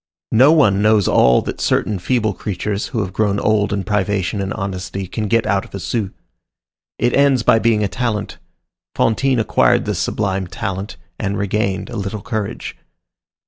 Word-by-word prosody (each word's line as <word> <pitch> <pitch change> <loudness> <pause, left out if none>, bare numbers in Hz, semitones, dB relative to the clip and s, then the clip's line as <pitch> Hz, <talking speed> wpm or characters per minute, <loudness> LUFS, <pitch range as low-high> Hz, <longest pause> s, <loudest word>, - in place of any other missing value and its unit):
No 130 +6 +6
one 105 -12 +4
knows 105 -2 +3
all 60 -1 +4
that - - -5
certain 105 -3 0
feeble 110 +2 0
creatures, 100 +2 -3
who 120 -8 -2
have 95 -2 -4
grown 100 -1 +1
old 110 -1 +1
in 100 -1 -1
privation 100 -1 -1
and 95 0 -3
honesty, 95 -1 -4
can 105 +4 -4
get 115 +1 +2
out 95 0 +1
of - - -11
a - - -4
sou. 105 0 -2 0.9
It 120 0 +1
ends 140 -3 +3
by 115 - +4
being 110 -2 +2
a - - +1
talent. 115 -3 -3 0.6
Fantine 130 +3 +2
acquired 110 - +2
this - - -2
sublime 95 -3 -1
talent, 95 +3 -5 0.2
and 100 0 -2
regained 100 -1 -1
a 120 - -5
little 100 0 -4
courage. 110 -3 -4
105 Hz, 170 wpm, -19 LUFS, 100-110 Hz, 0.9 s, No